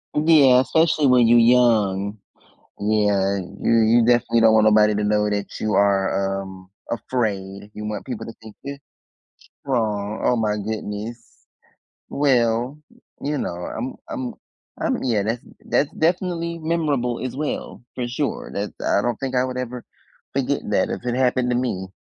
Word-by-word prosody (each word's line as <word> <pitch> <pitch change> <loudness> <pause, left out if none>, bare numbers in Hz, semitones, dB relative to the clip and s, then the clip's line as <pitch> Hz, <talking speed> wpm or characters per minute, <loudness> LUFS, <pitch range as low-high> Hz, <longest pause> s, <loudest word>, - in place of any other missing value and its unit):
Yeah, 150 -5 +6
especially 160 +1 +2
when 125 -2 +5
you 120 +1 +6
young. 110 -4 +3 0.6
Yeah, 100 -2 +1 0.2
you 115 - +2
you 115 +1 +4
definitely 120 -1 +3
don't 110 -1 +6
want 110 -1 +5
nobody 105 0 +5
to 105 0 -1
know 105 0 +2
that 100 -1 -1
you 110 -1 -1
are, 100 -1 +1
um, 95 -1 -12 0.2
afraid. 105 -4 -3
You 105 - -7
want 105 +1 -5
people 115 -4 -5
to 115 - -7
think 110 -2 -12
you're 140 0 -6 0.8
strong 110 -5 -1
oh 125 - +3
my 105 -2 0
goodness. 110 +2 -6 0.6
Well, 125 -1 +1 0.2
uh, - - -24 0.3
you 145 +1 -1
know, 85 - -3
I'm 125 +4 -5
I'm 260 -6 -4 0.5
I'm 260 - -1
yeah, 110 -6 +1
that's 115 +3 -2 0.2
that's 145 - +1
definitely 170 0 -1
memorable 150 -7 -1
as 130 - -5
well, 150 -4 -4
for 125 -1 -3
sure. 130 +3 -3
That's 100 +1 -3
I 100 - +2
don't 120 0 -2
think 130 -1 -4
I 125 - +3
would 130 0 -5
ever 125 -1 -5 0.5
forget - - 0
that - - +2
if - - -5
it 120 0 -1
happened 125 -1 +1
to - - +1
me. 105 -7 -2
115 Hz, 160 wpm, -22 LUFS, 105-130 Hz, 0.8 s, Yeah